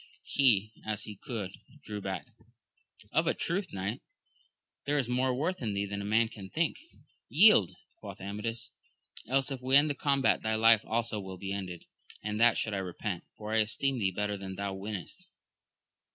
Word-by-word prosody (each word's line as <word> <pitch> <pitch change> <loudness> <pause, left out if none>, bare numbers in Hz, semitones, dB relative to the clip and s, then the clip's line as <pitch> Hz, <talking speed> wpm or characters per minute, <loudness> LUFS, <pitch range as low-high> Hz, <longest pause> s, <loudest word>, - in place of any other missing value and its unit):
He, 110 -6 +3
as 110 -1 -3
he 105 - -7
could, 110 -5 -5 0.3
drew 105 -1 -5
back, 95 -2 -4 0.5
— 105 - -26
Of 160 +2 +3
a - - +2
truth, 185 +2 -1
knight, 100 +4 -3 0.8
there 145 +1 +1
is 135 -5 +1
more 125 +1 +1
worth 165 +7 -1
in 105 -4 -1
thee 100 0 0
than 100 0 -4
man 115 +1 +4
can 105 -4 -10
think. 165 - 0 0.5
Yield! 175 - +6 0.2
quoth - - -9
Amadis, 105 +4 -4 0.6
else 135 +3 +2
if 130 -2 -4
we 130 +1 +2
end 145 +1 +6
the - - 0
combat 140 -1 +2
thy 110 0 0
life 115 0 +6
also 115 -1 -1
will 95 -1 -7
be 95 +1 -4
ended; 90 -4 -5 0.4
and 105 +1 -2
that 120 0 +6
should 110 - -1
I - - 0
repent, 95 0 -4
for 105 0 -5
I - - +3
esteem 110 +5 +1
of - - -4
theeJ)etter 100 +1 -1
than 95 -1 -6
thou 100 0 -3
weenest. 100 0 -6
110 Hz, 180 wpm, -31 LUFS, 100-130 Hz, 0.8 s, Yield